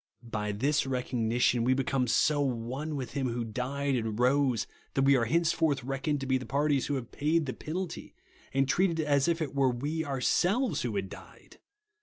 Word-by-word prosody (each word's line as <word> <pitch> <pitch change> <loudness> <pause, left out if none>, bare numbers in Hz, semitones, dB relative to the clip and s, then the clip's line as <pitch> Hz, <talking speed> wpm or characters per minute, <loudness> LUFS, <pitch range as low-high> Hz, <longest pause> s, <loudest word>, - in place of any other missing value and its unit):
By 110 -3 -3
tliis 135 +7 +1
recogni 125 -2 -1
tion, 120 -1 +3
we 130 +2 +3
become 130 -1 0
so 145 +5 +3
one 130 +4 -2
with 130 -3 -5
Hirn 135 -3 -1
who 120 0 -2
died 135 +5 -2
and 110 -2 -2
rose, 130 -1 +2 0.3
that 135 - +3
we 140 0 +5
are 120 -3 +2
henceforth 160 -1 +1
reckoned 135 +2 -2
to - - -3
be 130 0 +1
the 125 - -7
parties 145 -1 +1
who 145 - -1
have 125 -3 -5
paid 155 +2 +1
the 130 - -3
penahy, 170 +2 -5 0.4
and 135 0 +1
treated 170 +3 +2
as 145 -2 +2
if 170 -1 +1
it 145 - -5
were 135 -2 +3
we 145 +6 -2
ourselves 175 - +1
who - - -2
had - - -1
died. - - -14
135 Hz, 195 wpm, -29 LUFS, 125-150 Hz, 0.4 s, we